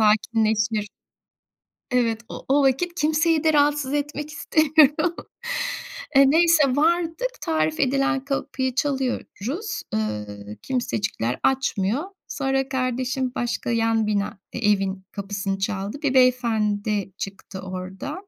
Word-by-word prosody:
sakinleşir. 215 0 +2 1.0
Evet, 230 -3 +1
o - - -8
o 280 +1 +4
vakit 340 +7 +1
kimseyi 315 +1 +2
de 315 -1 +3
rahatsız 290 -1 +2
etmek 295 +1 -2
istemiyorum. 310 +1 +3 1.0
Eee, 275 - +8
neyse, 330 -1 +5
vardık. 340 +10 0
Tarif 155 -1 0
edilen 275 +1 +1
kapıyı 270 -2 -2
çalıyoruz. 275 - -2
Iıı, 105 -1 -4
kimsecikler 210 - -2
açmıyor. 260 -2 +1 0.2
Sonra 270 -1 -1
kardeşim 255 0 -1
başka 240 0 -2
yan 225 -1 +2
bina 205 0 -1
e - - -4
evin 195 -1 -1
kapısını 195 -1 -3
çaldı. 200 +4 -2
Bir 275 -3 +1
beyefendi 215 -6 +2
çıktı 195 -1 -7
oradan. 185 - -6
255 Hz, 110 wpm, -24 LUFS, 205-290 Hz, 1.0 s, Eee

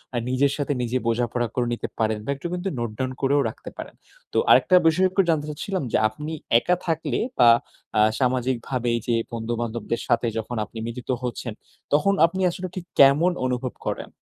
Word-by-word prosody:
আ - - +1
নিজের 135 +2 +2
সাথে 145 0 -1
নিজে 120 +1 0
বোঝাপড়া 120 +1 0
করে 125 -1 +1
নিতে 120 - -3
পারেন 110 -1 +1
বা, - - -7
একটু 140 +5 -5
কিন্তু 180 +2 -2
নোট 120 -2 -2
ডাউন 130 0 -2
করেও 140 +1 +3
রাখতে - - -10
পারেন। - - -8 0.4
তো - - 0
আরেকটা 185 - +6
বিষয় 175 +4 +4
একটু 195 - +3
জানতে 155 -3 +1
চাচ্ছিলাম 185 +4 -3
যে - - +3
আপনি 150 +8 -7 0.3
একা 180 +9 +1
থাকলে 165 -1 -1 0.2
বা, 120 - +8 0.5
আ - - +6 0.2
সামাজিকভাবে 125 -1 0 0.2
যে 120 - +2 0.2
বন্ধুবান্ধবদের 115 0 -3
সাথে 120 0 +2
যখন 115 +2 -4
আপনি 115 - -13
মিলিত 120 +1 -7
হচ্ছেন 120 -2 -4 0.4
তখন 190 +7 +4
আপনি 185 +3 -2
আসলে 180 +2 -5
ঠিক 185 -2 -5
কেমন 140 +6 +6
অনুভব 125 -1 -2
করেন? - - -4
130 Hz, 180 wpm, -24 LUFS, 120-155 Hz, 0.5 s, বা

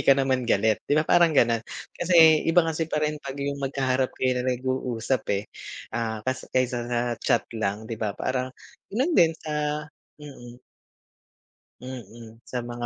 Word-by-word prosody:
ka 135 - +5
naman 130 -3 0
galit, 110 +1 +2
'di 145 - +3
ba, 155 - +3
parang 165 -3 +4
gano'n, 115 -2 +4 0.3
kasi 160 -3 +6
iba 165 0 +5
kasi 160 0 -2
pa 150 -1 0
rin 150 -1 -2
pag 135 0 -7
yung 140 0 -3
magkaharap 130 -1 0
kayo 130 -1 +1
na 130 - -1
nag-uusap, 130 -1 -1
eh, 100 - -4 0.5
ah, 110 -2 -3
kas 130 0 -3
kaysa 125 -2 -1
sa 120 -1 0 0.2
chat - - +2
lang, 105 -1 -2
'di 115 0 -5
ba, 105 -3 -2
parang 130 0 -1 0.4
yun 265 - 0
din 165 - +5
sa 150 -1 -2 0.3
mm. 125 -5 -12 1.2
Mm, 115 -3 -10
sa 125 -1 -4
mga 120 0 -5
130 Hz, 165 wpm, -25 LUFS, 120-150 Hz, 1.2 s, kasi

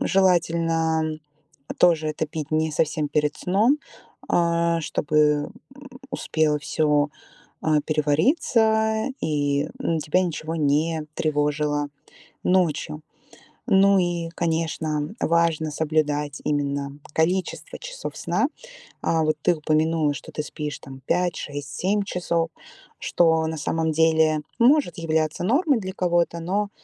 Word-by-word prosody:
желательно 165 -4 +1 0.6
тоже 160 -3 +4
это 155 +1 -2
пить 155 -1 -6
не 155 0 +1
совсем 150 -1 0
перед 150 0 0
сном, 220 +11 +2 0.5
э, 170 -1 +2
чтобы, 150 -1 +1 0.3
м, 275 -1 -13 0.2
успело 155 -2 0
всё, 150 -1 +1 0.5
э, 155 -2 +3
перевариться 220 - +2
и, 145 -1 0
м, 165 - 0
тебя 155 +5 +1
ничего 165 -2 -3
не 155 +1 +1
тревожило 150 -1 0 0.6
ночью. 155 -4 +1 0.7
Ну 195 0 +5
и, 175 -2 -1
конечно, 160 0 -1
важно 165 -2 +1
соблюдать 150 -2 -1
именно 140 -1 -2 0.2
количество 185 - -1
часов - - -7
сна. - - 0 0.6
Э, 165 -1 +2
вот 155 0 +1
ты 175 - +3
упомянула, 155 0 +1
что 140 - -9
ты 150 - -3
спишь 150 -2 -5
там 135 0 -11
5-6-7 175 +2 -1
часов, 170 -3 -1 0.5
что 160 -2 +2
на 160 - -3
самом 160 +1 -1
деле 160 -1 +3 0.2
может 270 - +4
являться 160 0 -1
нормой 280 - +3
для 190 -1 -5
кого-то, 175 -2 +1
но 200 +4 -1
160 Hz, 115 wpm, -24 LUFS, 150-175 Hz, 0.7 s, Ну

